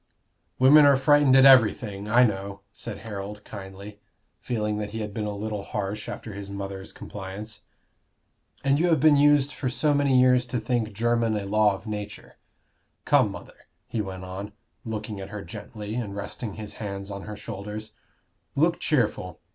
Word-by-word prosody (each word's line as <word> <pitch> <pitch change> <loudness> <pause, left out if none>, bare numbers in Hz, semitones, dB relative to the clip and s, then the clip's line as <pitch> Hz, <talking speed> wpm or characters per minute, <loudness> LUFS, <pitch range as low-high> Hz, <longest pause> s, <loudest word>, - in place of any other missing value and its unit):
"Women 145 +3 +7
are 140 - +6
frightened 140 0 +5
at 135 0 +7
everything 110 -5 +5
I 120 +3 +6
know," 100 -3 -2
said - - -7
Harold, 105 0 -6
kindly, 100 +1 -9 0.4
feeling 105 -3 -2
that 105 -1 -3
he 110 +1 -5
had 105 -1 -5
been 105 0 -3
a 105 - -4
little 105 0 -4
harsh 100 +1 -4
after 110 - -7
his 100 0 -7
mother's 100 -1 -6
compliance. 105 +2 -8 1.0
"And 140 +1 +3
you 175 - +3
have 165 -3 +3
been 155 -1 +6
used 145 0 +4
for 130 - -2
so 145 +3 +1
many 140 -2 +3
years 125 -1 +4
to 120 0 -2
think 115 -1 -1
Jermyn 115 0 +1
a 100 - -4
law 105 0 +3
of 95 - -12
nature. 105 -1 -7 0.7
Come, - - +4
mother," - - -11 0.2
he 115 - -2
went 95 -2 -6
on, 95 +2 -7 0.3
looking 110 -2 -5
at 95 0 -7
her 105 -1 -6
gently, 105 +5 -8
and 110 -4 -4
resting 100 +2 -5
his 105 0 -7
hands 100 -1 -5
on 100 0 -6
her 105 +1 -7
shoulders, 105 0 -7 0.6
"look 165 +4 +2
cheerful. 105 - 0
105 Hz, 170 wpm, -26 LUFS, 100-125 Hz, 1.0 s, Women